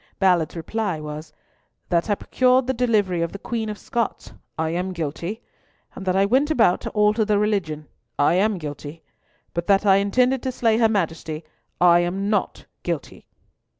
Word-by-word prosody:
Ballard's 180 -5 +2
reply 185 +1 -2
was, 150 +1 -7 0.6
"That 170 +3 +1
I 205 - +3
procured 255 +4 +2
the 260 - 0
delivery 215 -8 +1
of 170 - -2
the - - -5
Queen 220 +1 -3
of 210 - -5
Scots, 235 0 -3 0.2
I 160 0 -1
am 180 +2 -2
guilty; 170 +7 -4 0.5
and 190 - -9
that 185 - +2
I 195 +1 +4
went 265 +8 +2
about 225 - +3
to - - -4
alter 210 +1 +2
the 210 -1 +2
religion, 185 -8 -1 0.3
I 145 - +3
am 200 +3 +2
guilty; 150 0 -8 0.5
but 170 0 -3
that 200 +1 +3
I 195 -1 +6
intended 250 +6 +2
to 260 - -2
slay 225 -3 +1
her 225 -2 +4
Majesty, 165 -5 -2 0.4
I 175 -1 +6
am 190 +4 -1
not 205 -3 -1 0.2
guilty." 170 -4 -5
195 Hz, 175 wpm, -23 LUFS, 170-220 Hz, 0.6 s, I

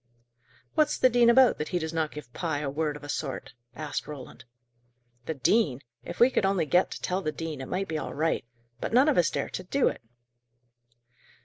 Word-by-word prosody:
"What's 300 -1 +2
the 255 - +4
dean 240 0 +5
about, 255 +1 +5
that 150 - -2
he 180 - -1
does 160 -1 -3
not 160 -2 0
give 150 -5 -10
Pye 165 -4 -2
a 140 -2 -2
word 150 0 -1
of 150 - -11
a - - -7
sort?" 140 -4 -4 0.2
asked 155 -2 -4
Roland. 140 -4 -9 0.8
"The 160 - -2
dean! 140 - +2 0.2
If - - -8
we 245 +2 +6
could - - +1
only 195 -4 +2
get 180 +5 +3
to - - -7
tell 185 +1 -1
the 155 - -2
dean, 160 -3 -5
it 130 - -6
might 195 +1 -2
be 155 -1 -2
all - - -6
right. 160 0 0 0.4
But - - -4
none 260 +5 +6
of 285 - +3
us 170 - +3
dare - - -3
do 185 +10 0
it." - - -8
160 Hz, 210 wpm, -28 LUFS, 150-195 Hz, 0.8 s, we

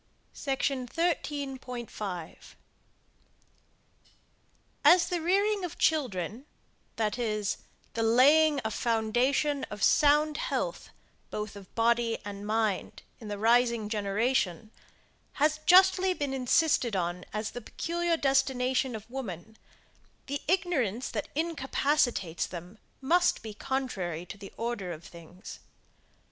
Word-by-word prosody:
SECTION 270 -2 -1
13.5. 260 - -3 2.5
As 350 0 +6
the 350 -2 -1
rearing 400 +4 +2
of 355 - -5
children, 250 - 0 0.5
that 220 +1 -1
is, 215 -3 -1 0.3
the 230 - -2
laying 285 +6 +5
a 220 - -1
foundation 245 +6 +1
of 210 -1 -7
sound 300 0 +4
health - - -3 0.4
both 210 0 -5
of 195 -2 -13
body 230 0 +2
and 205 0 -6
mind 215 -3 -1 0.2
in 220 - -9
the 205 -1 -4
rising 235 0 +3
generation, 215 0 0 0.6
has 305 +1 +1
justly 375 +1 +6
been 285 -4 -2
insisted 260 -2 +2
on 175 0 -2
as 215 0 -3
the 245 - -7
peculiar 340 +7 -1
destination 265 -3 +1
of 215 0 -8
woman, 220 -6 -7 0.7
the 280 0 -4
ignorance 295 - 0
that - - -4
incapacitates 280 - 0
them 180 +4 -9 0.2
must 350 +6 +2
be 220 -1 -6
contrary 200 -10 -3
to 200 - -9
the 200 - -10
order 230 -5 -3
of 165 0 -8
things. 170 +2 -11
245 Hz, 110 wpm, -29 LUFS, 210-295 Hz, 2.5 s, As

